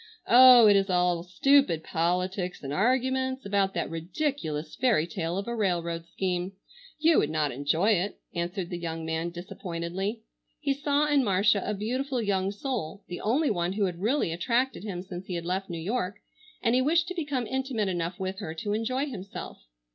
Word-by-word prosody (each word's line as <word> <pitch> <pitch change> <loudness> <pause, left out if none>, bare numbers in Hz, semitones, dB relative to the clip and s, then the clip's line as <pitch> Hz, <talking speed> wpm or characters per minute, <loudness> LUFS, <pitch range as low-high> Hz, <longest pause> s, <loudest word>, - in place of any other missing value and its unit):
"Oh, 250 -1 +9
it 205 - +6
is 195 0 +2
all 180 -1 +2
stupid 180 - +3
politics 180 +2 -1
and 135 +1 -4
arguments 260 - +1
about 200 -1 +1
that - - -1
ridiculous 165 - -3
fairy 235 -11 +2
tale 170 +1 -3
of 200 - -3
a 235 - -2
railroad 170 -5 -1
scheme. 180 0 -2 0.4
You 320 +1 +4
would 150 - +1
not 155 -2 0
enjoy 145 - +1
it," 195 0 0 0.2
answered 175 +1 -3
the 175 - -3
young 165 -1 -4
man 160 +1 -2
disappointedly. 180 +4 -5 0.4
He 280 -2 0
saw 285 +1 +1
in 290 -2 +3
Marcia 200 -1 +3
a 210 - -2
beautiful 255 +6 -2
young 195 -3 0
soul, 205 - -4
the 175 - -5
only 270 +7 +2
one 175 -2 -1
who 200 0 +1
had 175 -2 -4
really 230 - +1
attracted 235 +11 0
him 185 -4 -5
since 185 0 -8
he 180 - -3
had 170 -1 -4
left 190 +2 -2
New 170 - -4
York, 200 +2 -2 0.5
and 235 -1 +3
he 255 - +4
wished 330 +5 +2
to - - -3
become 290 -8 -2
intimate 260 -4 -1
enough 175 -1 -2
with 190 +1 -3
her 160 -6 -5
to 205 +5 -3
enjoy 255 +6 -1
himself. 195 - -8
195 Hz, 185 wpm, -28 LUFS, 175-250 Hz, 0.5 s, Oh